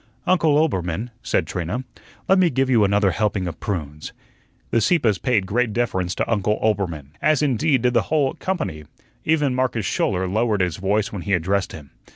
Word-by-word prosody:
"Uncle 165 -5 +3
Oelbermann," 105 - -1
said - - 0
Trina, 90 +10 -3 0.4
"let 190 0 +4
me 180 -2 +4
give 135 -1 0
you 115 -4 +5
another 100 -1 +3
helping 105 -3 -1
of 80 - -6
prunes." 75 -6 -5 0.6
The 115 - +2
Sieppes 110 - +2
paid 105 -2 +1
great 115 +3 0
deference 95 -6 -1
to - - -1
Uncle 105 -1 +1
Oelbermann, 90 -10 -1
as 155 -1 +3
indeed 135 -1 +1
did 125 -1 +2
the 115 - +4
whole 145 -4 +2
company. 80 - -4 0.4
Even 150 -4 +2
Marcus 125 -4 -1
Schouler 95 -1 0
lowered 105 +1 +1
his 90 -4 -1
voice 100 +2 0
when 100 - -4
he 100 +2 -2
addressed 95 +2 0
him. 75 -3 -11
105 Hz, 180 wpm, -22 LUFS, 95-130 Hz, 0.6 s, you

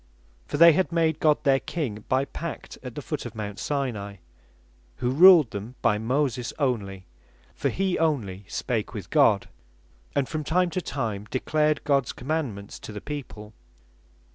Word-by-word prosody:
For - - -3
they 170 +1 +9
had 185 +3 +1
made 160 -2 +1
God 150 -1 +3
their 135 -2 +4
King 120 -12 -4
by 130 +1 +2
pact 165 +3 -7
at 125 -3 -8
the 145 - -6
foot 150 0 -4
of 115 - -11
Mount 105 -2 -5
Sinai; 120 -9 -3 0.8
who 125 - -1
ruled 165 -3 +8
them 105 +5 -6
by 105 - +3
Moses 125 +1 -1
only; 100 -9 -2 0.5
for - - -1
he 190 -1 -1
only 115 - -1
spake - - -3
with - - -7
God, - - +4 0.7
and 140 -2 +1
from 155 -1 -3
time 175 +3 +1
to 185 - -2
time 110 - -4
declared 150 +3 +1
Gods 140 -4 +1
Commandements 125 -8 -4
to - - -9
the 105 - -6
people. 110 -6 -7
135 Hz, 160 wpm, -26 LUFS, 110-155 Hz, 0.8 s, they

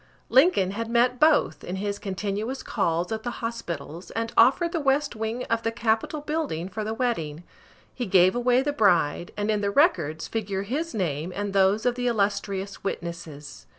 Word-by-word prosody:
Lincoln 255 - +4
had 230 +3 -4
met 245 +1 +2
both, 310 -1 +3
in 180 - -4
his 200 +1 -3
continuous 205 +5 -3
calls 175 -4 -1
at 220 0 -2
the 240 - -3 0.2
hospitals, 170 -7 -6
and 230 0 -3
offered 275 +9 +5
the 340 - -1
west 280 -1 +1
wing 220 +3 -3
of 230 0 -1
the 225 - -1
Capitol 230 +5 -1
building 295 - -3
for 215 +3 -4
the 220 +1 -3
wedding. 175 -11 -2 0.5
He 245 -3 -4
gave 185 +1 +5
away 245 +1 +3
the 290 +1 -1
bride, 175 - +2
and 205 +1 0
in 210 -1 0
the 200 - 0
records 170 - +2
figure 200 -3 -3
his 295 +10 -3
name 165 -3 -2
and 205 -1 -3
those 195 +3 +3
of 245 - +3
the 245 0 -2
illustrious 200 -3 -1
witnesses. 165 -6 -6
215 Hz, 180 wpm, -25 LUFS, 185-245 Hz, 0.5 s, offered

